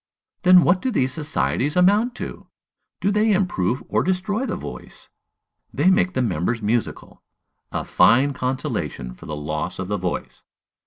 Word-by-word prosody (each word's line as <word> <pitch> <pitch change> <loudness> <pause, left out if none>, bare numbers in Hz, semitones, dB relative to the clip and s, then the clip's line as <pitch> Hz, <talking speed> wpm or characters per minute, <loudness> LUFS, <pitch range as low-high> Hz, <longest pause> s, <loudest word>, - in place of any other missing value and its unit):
Then 185 -2 +7
what 180 +1 +3
do 260 - -1
these 130 - 0
societies 150 -1 -1
amount 205 +7 +3
to? - - -7 0.5
Do 200 - +2
they 215 +2 +2
improve 175 - 0
or - - +1
destroy 195 +7 -1
the - - -2
voice? - - -9 0.6
They 185 - +3
make 185 -1 +2
the 130 - 0
members 100 +2 -1
musical. 110 +1 -3 0.5
A - - -2
fine 135 +4 +4
consolation 125 - -3
for - - -13
the 75 - -4
loss 75 +3 -4
of 95 0 -5
the 105 - 0
voice! 90 -1 -4
140 Hz, 155 wpm, -22 LUFS, -, 0.6 s, Then